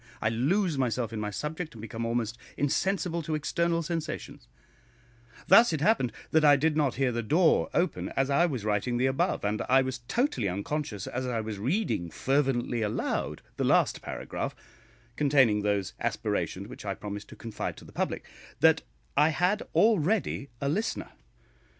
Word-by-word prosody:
I 110 Hz, -, +1 dB
lose 150 Hz, -, +1 dB
myself 120 Hz, -3 st, -1 dB
in 110 Hz, -, -3 dB
my 105 Hz, -1 st, -2 dB
subject, 150 Hz, -, -5 dB
and -, -, -10 dB
become 115 Hz, 0 st, -4 dB
almost 115 Hz, -1 st, -1 dB, 0.2 s
insensible 170 Hz, +4 st, 0 dB
to 155 Hz, 0 st, -2 dB
external 170 Hz, +2 st, 0 dB
sensations; 155 Hz, -, -5 dB, 1.0 s
thus 230 Hz, +1 st, +7 dB
it 155 Hz, -, 0 dB
happened 150 Hz, -, +3 dB, 0.2 s
that 160 Hz, -1 st, +4 dB
I 145 Hz, -1 st, +8 dB
did 150 Hz, +2 st, +1 dB
not 145 Hz, -4 st, +1 dB
hear 130 Hz, -1 st, +1 dB
the 120 Hz, 0 st, -1 dB
door 160 Hz, +9 st, +3 dB
open 180 Hz, +2 st, 0 dB
as 135 Hz, +1 st, +2 dB
I 170 Hz, +6 st, +4 dB
was 130 Hz, -10 st, -4 dB
writing 110 Hz, +3 st, 0 dB
the 125 Hz, -, +2 dB
above, 130 Hz, -5 st, 0 dB
and 105 Hz, +1 st, 0 dB
I 135 Hz, +1 st, +5 dB
was 130 Hz, 0 st, -3 dB
totally 230 Hz, -, 0 dB
unconscious 105 Hz, +2 st, -3 dB
as 130 Hz, +1 st, -3 dB
I 120 Hz, -2 st, -1 dB
was 110 Hz, -2 st, -4 dB
reading 115 Hz, -, -1 dB
fervently 130 Hz, -, 0 dB
aloud 105 Hz, -1 st, -2 dB
the -, -, 0 dB
last -, -, +3 dB
paragraph, -, -, -4 dB, 0.6 s
containing 135 Hz, -8 st, +4 dB
those 100 Hz, -2 st, 0 dB
aspirations -, -, -2 dB
which -, -, -10 dB
I -, -, -3 dB
promised 105 Hz, 0 st, -6 dB
to -, -, -11 dB
confide 115 Hz, -2 st, -5 dB
to -, -, -12 dB
the -, -, -13 dB
public, -, -, -2 dB, 0.3 s
that -, -, +5 dB, 0.3 s
I 150 Hz, +2 st, +5 dB
had 180 Hz, +6 st, +1 dB
already 205 Hz, -7 st, +2 dB
a 140 Hz, -, -2 dB
listener. 205 Hz, +11 st, -2 dB
135 Hz, 170 wpm, -28 LUFS, 115-160 Hz, 1.0 s, I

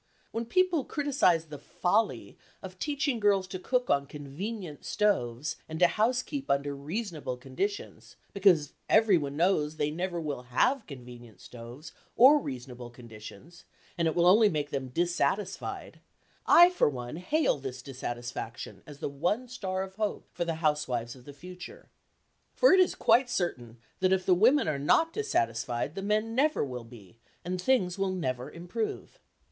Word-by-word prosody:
When 230 Hz, +1 st, -3 dB
people 355 Hz, +1 st, +2 dB
criticise 265 Hz, -, +1 dB
the 150 Hz, -2 st, -9 dB
"folly" 210 Hz, +5 st, -1 dB, 0.3 s
of -, -, -9 dB
teaching 285 Hz, -4 st, -1 dB
girls 200 Hz, -3 st, +2 dB
to 185 Hz, -, -5 dB
cook 250 Hz, +5 st, 0 dB
on 140 Hz, 0 st, +1 dB
convenient 150 Hz, +4 st, -7 dB
stoves 150 Hz, -, 0 dB
and 160 Hz, -, -5 dB
to 180 Hz, -, +5 dB
housekeep 250 Hz, -, 0 dB
under 140 Hz, +1 st, 0 dB
reasonable 155 Hz, -, -4 dB
conditions, 140 Hz, +11 st, -5 dB, 0.2 s
because 180 Hz, -7 st, +3 dB, 0.2 s
everyone 175 Hz, -11 st, +3 dB
knows 155 Hz, -3 st, +1 dB
they 150 Hz, -1 st, -1 dB
never 175 Hz, +2 st, -3 dB
will 150 Hz, -5 st, -4 dB
have 205 Hz, -, +1 dB
convenient 120 Hz, -, -11 dB
stoves 120 Hz, +9 st, -11 dB, 0.2 s
or 275 Hz, +5 st, +7 dB
reasonable 125 Hz, -, -7 dB
conditions, 120 Hz, +6 st, -13 dB, 0.3 s
and 170 Hz, -1 st, +1 dB
it 160 Hz, -, -1 dB
will 175 Hz, -, +3 dB
only 210 Hz, +4 st, +6 dB
make 150 Hz, -4 st, -3 dB
them 135 Hz, -2 st, -3 dB
dissatisfied, 175 Hz, +6 st, -2 dB, 0.5 s
I 350 Hz, +1 st, +8 dB
for 360 Hz, -, +2 dB
one 125 Hz, +1 st, -6 dB
hail 290 Hz, -, +1 dB
this 130 Hz, -2 st, -7 dB
dissatisfaction 120 Hz, -3 st, -6 dB
as 145 Hz, -2 st, -10 dB
the -, -, -1 dB
one 175 Hz, -, -1 dB
star 190 Hz, -6 st, -3 dB
of 190 Hz, 0 st, -10 dB
hope 215 Hz, -1 st, -2 dB
for 175 Hz, -, -2 dB
the 165 Hz, -1 st, -2 dB
housewives 125 Hz, -6 st, 0 dB
of 125 Hz, -1 st, -16 dB
the 145 Hz, -, -9 dB
future. 180 Hz, -, -11 dB, 0.7 s
For -, -, +6 dB
it 380 Hz, -, +6 dB
is 370 Hz, -, +3 dB
quite 250 Hz, +1 st, +3 dB
certain 125 Hz, -, -3 dB, 0.2 s
that 185 Hz, 0 st, +3 dB
if 185 Hz, -1 st, 0 dB
the 185 Hz, -, +5 dB
women 235 Hz, -, +4 dB
are 150 Hz, -3 st, -1 dB
not 325 Hz, -, +3 dB
dissatisfied, 120 Hz, -, -1 dB
the 195 Hz, -, -5 dB
men 215 Hz, +3 st, 0 dB
never 290 Hz, -, +2 dB
will 125 Hz, -3 st, -7 dB
be, 115 Hz, -3 st, -15 dB, 0.3 s
and 180 Hz, +1 st, -3 dB
things 190 Hz, -6 st, +1 dB
will 195 Hz, 0 st, +1 dB
never 130 Hz, -8 st, -3 dB
improve. 215 Hz, -, -5 dB
175 Hz, 160 wpm, -29 LUFS, 135-215 Hz, 0.7 s, I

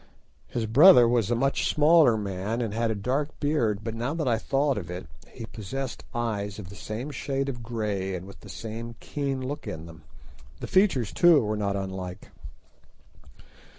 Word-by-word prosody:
His 115 Hz, -, -2 dB
brother 125 Hz, -, +8 dB
was 115 Hz, -3 st, +1 dB
a 120 Hz, -, +2 dB
much 135 Hz, +4 st, +1 dB
smaller 150 Hz, -5 st, +5 dB
man 100 Hz, +2 st, -3 dB
and 115 Hz, -4 st, -2 dB
had 115 Hz, +1 st, 0 dB
a 110 Hz, -, 0 dB
dark 135 Hz, +8 st, -2 dB
beard, 120 Hz, -9 st, +1 dB
but 115 Hz, 0 st, -4 dB
now 120 Hz, +7 st, -2 dB
that 160 Hz, -4 st, -2 dB
I 115 Hz, -2 st, +2 dB
thought 135 Hz, -1 st, +1 dB
of 85 Hz, -3 st, -9 dB
it, 90 Hz, -2 st, -6 dB, 0.2 s
he -, -, -8 dB
possessed 115 Hz, +5 st, -6 dB
eyes 105 Hz, -4 st, -2 dB
of 100 Hz, -4 st, -8 dB
the 100 Hz, -, -10 dB
same 115 Hz, +8 st, -5 dB
shade 135 Hz, -1 st, -2 dB
of 125 Hz, -3 st, -4 dB
grey 105 Hz, -5 st, -2 dB
and 90 Hz, 0 st, -6 dB
with 100 Hz, -, -12 dB
the -, -, -13 dB
same 115 Hz, +1 st, -7 dB
keen 135 Hz, -3 st, -3 dB
look 145 Hz, +2 st, -5 dB
in 80 Hz, 0 st, -6 dB
them: 85 Hz, -1 st, -12 dB, 0.6 s
the -, -, -5 dB
features 185 Hz, -, +2 dB
too 175 Hz, -4 st, +6 dB
were 105 Hz, 0 st, -1 dB
not 100 Hz, -1 st, -1 dB
unlike. 95 Hz, -2 st, -6 dB
115 Hz, 185 wpm, -27 LUFS, 100-135 Hz, 0.6 s, brother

